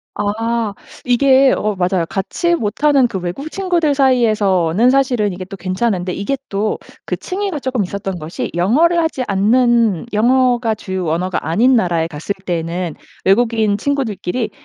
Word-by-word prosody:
아 220 +1 -1 0.3
이게 265 +2 +4
어 210 -1 -1
맞아요. 180 -1 0
같이 345 - -1
못하는 275 +1 +2
그 195 -5 -4
외국 180 - -5
친구들 345 -6 0
사이에서는 220 - +3
사실은 250 -7 +1
이게 185 +1 -6
또 195 - -8
괜찮은데 185 0 -1
이게 200 +10 -2
또 205 +2 -1 0.3
그 - - -2
층위가 380 -4 -3
조금 255 -5 -1
있었던 195 -1 -5
것이 155 +1 -5
영어를 295 - +3
하지 320 -6 0
않는 225 0 +2
영어가 240 0 +2
주요 190 -3 -4
언어가 175 0 -2
아닌 240 +10 +3
나라에 170 -5 +1
갔을 160 +6 -4
때에는 170 -1 -3 0.3
외국인 220 0 +2
친구들끼리 245 -4 -2
215 Hz, 330 characters per minute, -17 LUFS, 185-260 Hz, 0.3 s, 이게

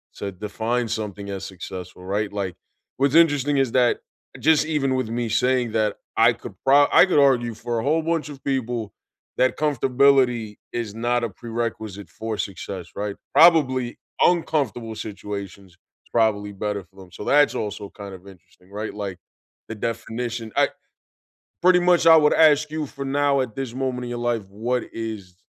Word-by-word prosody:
to 100 -1 -5
define 110 +5 -2
something 105 -2 -4
as 95 0 -5
successful, 90 -1 -8
right, 100 +2 -1
like, 95 -4 -3 0.4
what's 140 +2 +2
interesting 145 -4 +4
is 135 -4 +2
that 125 -2 +3 0.4
just 155 -1 +4
even 140 -4 0
with 130 -4 -2
me 120 0 -2
saying 125 +1 +1
that 110 -2 +1 0.2
I 115 +1 +6
could 115 - -10
pro 140 +2 +6
I - - +7
could 180 - +1
argue 125 -4 +3
for 120 +1 -3
a - - -3
whole 155 +4 +2
bunch 165 -2 -1
of 140 -2 -11
people 120 -5 -2 0.4
that 130 - +2
comfortability 130 -5 +2 0.2
is 110 -3 -4
not 120 +1 0
a 115 - -1
prerequisite 110 -3 -5
for 110 +4 -5
success, 95 -2 -5
right, 100 0 -3 0.2
probably 135 -6 +5 0.2
uncomfortable 135 - +1
situations, 100 -2 -7 0.3
it's - - -28
probably 105 -3 +1
better 100 0 -3
for 95 - -31
them, 95 -2 -13
so, - - -8
that's 145 +4 +4
also 105 -1 -4
kind 100 -2 -9
of 95 +2 -15
interesting, 90 -1 -18
right, 105 +2 -5
like 100 -3 -5 0.5
the 110 - -5
definition 115 +1 -4
I - - +4 0.9
pretty 180 0 +6
much 175 -2 +3
I 165 - +9
would 150 -2 +4
ask 150 -1 +5
you 155 -1 -3
for 140 0 -7
now 140 0 +2
at 120 -4 -3
this 130 -3 -4
moment 130 -1 -2
in 120 - -6
your 120 - -4
life, 120 -3 -1
what 120 +5 -2
is 110 -5 -6
115 Hz, 170 wpm, -23 LUFS, 105-135 Hz, 0.9 s, I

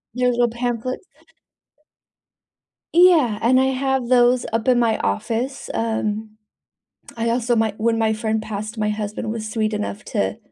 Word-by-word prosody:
those 250 0 +2
little 240 0 +2
pamphlets. 240 +4 -3 1.9
Yeah, 330 -11 +5
and 255 +3 +4
I 265 - +3
have 265 -1 0
those 245 0 +4
up 225 +2 -1
in 250 -1 +4
my 225 -2 +2
office, 235 - -2
um, 220 -1 -2 0.8
I 230 0 -1
also 240 0 +1
my 220 -2 +1
when 225 +1 +1
my 220 -1 +2
friend 220 0 -1
passed, 215 +2 -6
my 210 0 0
husband 210 +1 -4
was 220 -1 -4
sweet 215 -1 -1
enough 210 0 -4
to 215 0 -1
230 Hz, 150 wpm, -21 LUFS, 215-245 Hz, 1.9 s, Yeah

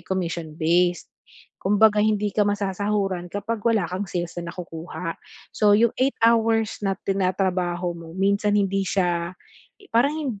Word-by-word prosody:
commission-based, 170 -1 0 0.5
kumbaga 210 +2 +4
hindi 210 -1 +1
ka 210 - +2
masasahuran 200 -2 -1
kapag 210 +2 -3
wala 225 -5 +3
kang 185 +3 -3
sales 175 -1 -3
na 170 - -6
nakukuha. 165 0 -6 0.4
So, 210 -1 +3
yung 230 +1 +3
8 270 +1 +2
hours 225 -1 +3
na 195 - +2
tinatrabaho 185 -2 -1
mo 165 -1 -10
minsan 200 +2 +2
hindi 195 -1 +1
siya 175 -2 0 0.6
parang 270 -2 +1
195 Hz, 125 wpm, -24 LUFS, 175-210 Hz, 0.6 s, kumbaga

